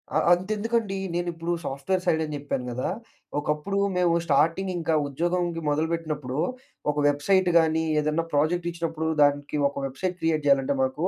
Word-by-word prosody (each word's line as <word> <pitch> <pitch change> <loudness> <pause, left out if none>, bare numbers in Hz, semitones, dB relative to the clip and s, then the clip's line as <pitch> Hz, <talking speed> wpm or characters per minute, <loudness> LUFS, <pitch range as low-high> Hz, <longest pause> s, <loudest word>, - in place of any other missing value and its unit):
అ - - +5 0.2
అంతెందుకండీ 210 +2 -1 0.2
నేనిప్పుడు 170 -1 -2
సాఫ్ట్‌వేర్ 145 +8 -2
సైడని 160 -3 +1
జెప్పాను 140 -3 -3
గదా! 125 +2 -2 0.5
ఒకప్పుడు 150 +6 -2 0.2
మేము 180 -2 +3
స్టార్టింగింకా 165 +3 +1
ఉద్యోగంకి 170 +3 -1
మొదలుబెట్టినప్పుడూ, 155 -3 -2 0.5
ఒక - - -9
వెబ్సైటు 180 +6 +2
గానీ, 160 0 +2 0.2
ఏదన్నా 155 +2 0
ప్రాజెక్టిచ్చినప్పుడు 165 +1 0
దానికి 145 +1 +2
ఒక - - -15
వెబ్సైట్ 180 +7 -3
క్రియేట్ 155 -2 +1
జేయాలంటే 140 -1 +3
మాకూ 130 +7 0
160 Hz, 125 wpm, -26 LUFS, 145-175 Hz, 0.5 s, అ